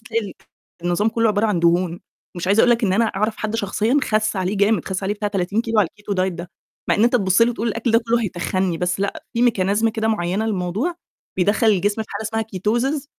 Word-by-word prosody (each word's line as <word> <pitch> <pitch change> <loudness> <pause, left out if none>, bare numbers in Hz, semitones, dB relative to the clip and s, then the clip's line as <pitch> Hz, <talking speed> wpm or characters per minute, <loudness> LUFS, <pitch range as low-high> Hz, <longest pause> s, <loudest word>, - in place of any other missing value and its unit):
تلاقي 225 -3 -3 0.5
النظام 175 +5 +1
كُلّه 230 0 +1
عبارة 210 +1 +2
عن 200 -6 0
دهون. 170 0 +1 0.4
مش 175 - -4
عايزة 200 +3 +4
أقول 245 - +5
لك 235 -1 +2
إن 190 - +1
أنا 225 +4 +3
أعرف 215 +1 -1
حد 215 +1 -3
شخصيًا 220 +5 +1
خَس 215 -1 0
عليه 190 +2 -1
جامد، 200 -2 +2
خس 190 +1 -3
عليه 200 +2 -1
بتاع 210 0 -2
30 200 +1 -1
كيلو 225 -1 -1
على 185 - +1
الKeto 205 -1 -5
diet 185 0 0
ده 175 0 -8 0.4
مع - - +4
إن 215 - +3
أنت 240 - +3
تبُص 190 0 +3
له 235 - +4
وتقول 230 0 -2
الأكل 230 +2 -1
ده 225 - +5
كُلّه 230 0 0
هيتخنّي، 185 -2 -1
بس 180 +2 -1
لأ 200 - -3
في 240 0 +3
Mechanism 205 +2 +1
كده 220 0 -1
معينة 205 0 -1
للموضوع، 210 - -2 0.4
بيدّخل 205 +5 +2
الجسم 205 +1 +2
في - - -15
حالة 200 - -4
اسمها 225 0 -1
Ketosis، 230 - -1
210 Hz, 230 wpm, -21 LUFS, 190-225 Hz, 0.5 s, أقول